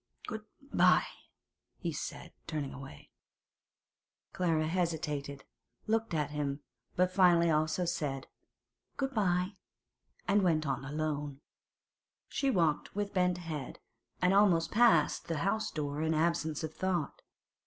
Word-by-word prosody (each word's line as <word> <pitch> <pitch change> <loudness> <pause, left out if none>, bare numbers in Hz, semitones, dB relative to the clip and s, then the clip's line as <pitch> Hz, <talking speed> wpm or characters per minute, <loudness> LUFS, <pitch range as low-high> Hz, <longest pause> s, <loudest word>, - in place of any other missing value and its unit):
'Good 220 -1 -6 0.3
bye,' - - +5 0.7
he - - -3
said, - - -6
turning 150 -4 -3
away. 135 0 -11 1.2
Clara 165 -4 +1
hesitated, 150 -5 -2 0.4
looked 225 -4 0
at 150 -2 0
him, 145 -1 -2 0.3
but 180 +1 +3
finally 175 -3 +5
also 155 +3 +1
said 145 -6 -2 0.7
'Good 270 -1 -1
bye,' 185 -2 +1 0.7
and 200 +1 +4
went 160 -4 +2
on 135 -1 -1
alone. 145 -1 -3 0.9
She 275 - 0
walked 165 - +1
with 205 0 -2
bent 180 -2 +2
head, 155 -6 -5 0.5
and 180 +1 +5
almost 180 -5 +4
passed 175 -8 +4
the 165 -2 -1
house 215 +2 0
door 145 -1 -3
in 160 0 +1
absence 160 -1 0
of 160 0 -4
thought. 175 -5 -2
165 Hz, 120 wpm, -32 LUFS, 150-185 Hz, 1.2 s, bye